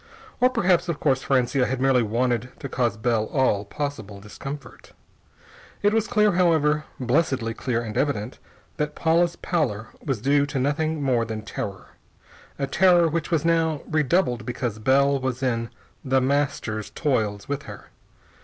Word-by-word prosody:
Or 250 - +5
perhaps, 180 -8 +2
of 165 - -2
course, 135 -3 +2
Francia 130 0 +1
had 130 0 -2
merely 130 -1 +3
wanted 120 +2 0
to - - -5
cause 120 -5 -1
Bell 110 -1 +1
all 110 -6 +1
possible 110 -5 -5
discomfort. 135 +6 -9 0.9
It 205 +1 +4
was 225 -1 +1
clear, 210 -3 +3
however, 155 -4 +2
blessedly 130 -3 0
clear 120 0 -2
and 110 -2 -6
evident, 125 -5 -1 0.4
that 150 0 -2
Paula's 170 +1 +2
pallor 110 - -2
was 135 -6 -2
due 140 +4 +2
to 145 - -4
nothing 150 +3 0
more 125 -4 +2
than 110 -1 -5
terror 100 -3 -6 0.7
a 140 - -1
terror 175 +3 +4
which 165 0 -2
was 165 -3 0
now 165 -3 +1
redoubled 155 -4 +1
because 120 -3 -3
Bell 140 +4 +3
was 130 0 -3
in 115 -2 0 0.3
The 135 -1 +2
Master's 130 -5 -1
toils 110 -9 -1
with 145 0 -3
her. - - -11
135 Hz, 155 wpm, -24 LUFS, 120-155 Hz, 0.9 s, Or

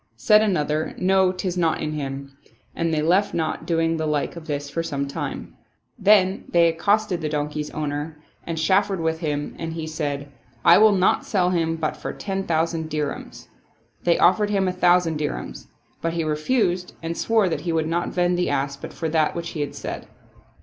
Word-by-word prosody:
Said 175 - +5
another, 155 -7 0
" - - -21
No, 190 0 +3
'tis 185 -1 -3
not 165 -2 +1
in 155 - -2
him 140 -2 -5 0.2
"; - - -36
and 165 -1 0
they 155 -1 0
left 185 +5 +2
not 160 -2 -2
doing 165 -1 +1
the 160 -1 -1
like 150 +1 -1
of 170 -1 -10
this 145 -1 -3
for 155 +4 -2
some 140 -4 -3
time. 140 - -5 0.5
Then 195 -2 +4
they 170 -1 +5
accosted 195 +2 +1
the 155 - -2
don 150 0 -1
key's 150 0 -4
owner 150 0 -4 0.3
and 165 -1 -4
chaffered 190 +4 +2
with 160 0 -1
him 145 -3 -3
and 165 -1 -4
he 160 -1 -4
said, 145 -3 -4 0.2
" 120 -1 -32
I - - +8
will 215 0 +7
not 185 0 +3
sell 180 -3 +1
him 165 -2 0
but 160 -2 -2
for - - -6
ten 195 -1 -4
thousand 160 0 0
dirhams." 150 -1 -4 0.6
They 170 -1 +3
offered 205 +3 +4
him 195 -2 +1
a 180 - 0
thousand 175 -3 +3
dirhains; 150 -1 -4 0.3
but 165 0 -1
he 170 -1 -1
refused 180 +4 0
and 165 +1 -3
swore 220 -1 +2
that 170 - -2
he 170 - -2
would 160 -1 0
not 170 +2 -1
vend 175 0 +1
the 180 - +1
ass 140 0 -1
but 140 - -9
for 165 - -3
that 155 -1 +1
which 170 0 -4
he 155 - -4
had 145 - -4
said. - - -6
165 Hz, 205 wpm, -23 LUFS, 150-180 Hz, 0.6 s, I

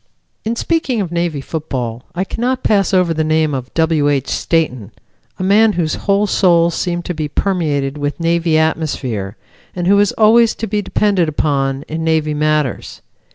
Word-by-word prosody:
In 225 +2 -2
speaking 280 -4 -1
of 185 -5 -3
Navy 170 -4 -1
football 130 -6 -5
I 180 - 0
cannot 250 +6 -2
pass 200 -3 +2
over 180 -3 +2
the 155 0 0
name 155 -1 +1
of 130 -1 -5
W. 160 -3 +2
H. 140 -2 -1
Stayton, 130 - -1 0.5
a - - -4
man 210 +3 +4
whose 165 -4 -1
whole 200 +1 +1
soul 170 -4 +3
seemed 175 +1 -3
to 180 - -3
be 155 -2 -3
permeated 150 -5 -1
with 145 +2 -3
Navy 165 -1 +1
atmosphere, 130 -10 -2 0.4
and 175 -1 -2
who 200 +2 +4
is 205 -1 +3
always 225 +1 +4
to 225 - -4
be 210 0 -1
depended 195 -5 +1
upon 140 -2 -1
in 160 +1 -4
Navy 160 -2 +1
matters. 150 -3 -1
165 Hz, 170 wpm, -17 LUFS, 150-195 Hz, 0.5 s, man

